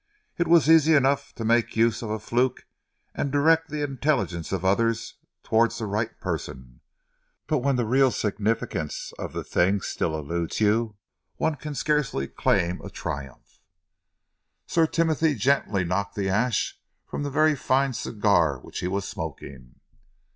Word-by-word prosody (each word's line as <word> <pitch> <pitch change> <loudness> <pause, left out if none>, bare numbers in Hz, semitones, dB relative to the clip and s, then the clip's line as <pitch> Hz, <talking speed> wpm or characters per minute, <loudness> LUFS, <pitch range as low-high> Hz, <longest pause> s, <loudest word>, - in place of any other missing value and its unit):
It 170 - 0
was 165 -2 +5
easy 160 -1 +6
enough 140 0 +2
to 115 - -5
make 115 +1 +2
use 115 0 +2
of 115 - -5
a 110 - -1
fluke 125 +3 -1 0.5
and 140 - -2
direct 160 +3 +3
the 150 0 -3
intelligence 125 - -1
of 95 -1 -2
others 115 +4 0 0.3
towards 115 +1 +2
the 115 - -3
right 105 +2 -3
person, 65 -1 -6 0.6
but 150 - +1
when 135 +1 +1
the 120 -2 0
real 130 +4 +4
significance 105 -8 -2
of - - -5
the - - -4
thing 95 +3 +2
still 80 -3 -2
eludes 85 +2 -3
you, 110 +1 +2 0.4
one 160 - 0
can 150 0 -7
scarcely 130 - 0
claim 85 +5 0
a - - -8
triumph." 70 -2 -7 1.0
Sir 165 -1 +2
Timothy 160 -2 +1
gently 110 -5 +1
knocked 100 +3 -2
the 100 -2 -1
ash 115 +5 0 0.3
from - - -5
the 145 - -2
very 155 +2 +3
fine 135 0 +1
cigar 100 - +1
which 65 - -8
he - - -2
was 100 +1 -2
smoking. 70 - -8
115 Hz, 155 wpm, -25 LUFS, 95-140 Hz, 1.0 s, easy